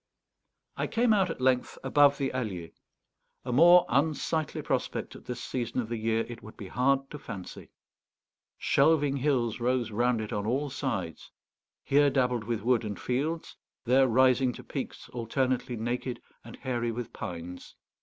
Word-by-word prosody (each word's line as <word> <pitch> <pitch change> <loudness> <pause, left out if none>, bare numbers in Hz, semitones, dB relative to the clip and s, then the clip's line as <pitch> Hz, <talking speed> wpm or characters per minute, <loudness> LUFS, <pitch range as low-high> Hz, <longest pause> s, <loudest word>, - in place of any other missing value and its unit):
I - - -1
came 230 -1 +3
out 190 -3 +2
at 165 - -5
length 130 -1 +1
above 140 +1 +5
the 135 -2 -2
Allier. 95 -10 -4 0.7
A 125 - -2
more 175 +6 +7
unsightly 155 +3 0
prospect - - -2
at - - -13
this 125 - -5
season 125 0 -3
of 115 -3 -3
the 120 - -2
year 110 0 +1
it 120 0 -7
would 110 - -12
be 100 - -8
hard 135 +4 +1
to 150 - -7
fancy. 100 -8 -8 0.9
Shelving 145 -3 +3
hills 125 -5 0
rose 120 -1 0
round 120 +2 +1
it 110 -1 -4
on 105 0 -2
all 135 +4 -1
sides, 95 - -4 0.5
here 145 +1 +4
dabbled 125 -4 0
with 115 -2 -2
wood 120 -1 +2
and 105 -2 -5
fields, 150 +6 -2 0.3
there 130 +2 +5
rising 130 +1 +4
to - - -10
peaks - - -6
alternately 125 +1 -1
naked 120 +2 -3 0.2
and 115 - -10
hairy 120 -3 -2
with 120 0 -6
pines. 90 -3 -7
125 Hz, 160 wpm, -29 LUFS, 115-140 Hz, 0.9 s, more